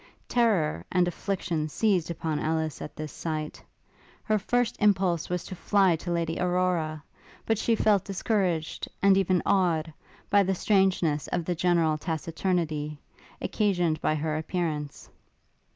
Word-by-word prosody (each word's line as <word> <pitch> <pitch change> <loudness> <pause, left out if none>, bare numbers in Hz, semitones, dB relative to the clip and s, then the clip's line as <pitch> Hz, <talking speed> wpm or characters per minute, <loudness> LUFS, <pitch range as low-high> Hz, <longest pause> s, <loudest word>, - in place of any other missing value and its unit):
Terror 195 - +1
and 180 -1 +3
affliction 175 -3 -2
seized 185 -1 +1
upon 160 -2 -2
Ellis 160 -1 -1
at - - -7
this 155 -2 -6
sight. 155 -1 -5 0.6
Her 215 -1 +1
first 245 +3 0
impulse 190 -5 +2
was 180 -1 -2
to - - -8
fly 190 -1 +3
to 175 - -7
Lady 165 -1 -1
Aurora; 175 -4 0 0.4
but 225 -2 +1
she 230 0 +2
felt 210 -3 +3
discouraged, 185 -5 -1 0.2
and 195 -1 +6
even 185 -2 +2
awed, 170 -5 +1 0.4
by 205 -1 +6
the 190 0 +1
strangeness 185 -7 +2
of 170 - -2
the 180 - 0
general 165 -3 +2
taciturnity, 160 -2 -2 0.4
occasioned 175 -7 0
by 155 - +1
her 155 0 -1
appearance. 155 -3 -3
175 Hz, 135 wpm, -27 LUFS, 155-195 Hz, 0.6 s, and